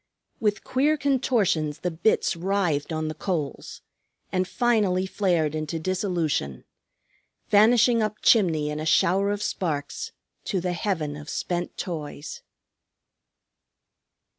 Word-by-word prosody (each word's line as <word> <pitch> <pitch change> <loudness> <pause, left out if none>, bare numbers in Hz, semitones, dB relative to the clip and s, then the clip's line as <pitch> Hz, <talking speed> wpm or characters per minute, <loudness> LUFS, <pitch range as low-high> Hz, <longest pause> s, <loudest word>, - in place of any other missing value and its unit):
With 210 -1 0
queer 295 +4 +2
contortions 225 - +1
the 180 - -1
bits 170 +4 +1
writhed 175 -5 0
on 155 0 -2
the 155 - -3
coals, 160 -5 -4 0.5
and 185 0 0
finally 210 -7 +1
flared 175 -6 0
into 155 +1 -3
dissolution, 165 - -1 0.8
vanishing 230 +2 +5
up 215 0 -1
chimney 160 -9 +4
in 150 - -4
a 155 - -4
shower 190 +4 +3
of 205 0 -2
sparks 150 -9 -3 0.3
to 190 - -1
the 180 0 -2
heaven 165 -5 -2
of 150 0 -9
spent 175 0 -3
toys. 155 -4 -6
180 Hz, 115 wpm, -25 LUFS, 155-205 Hz, 0.8 s, vanishing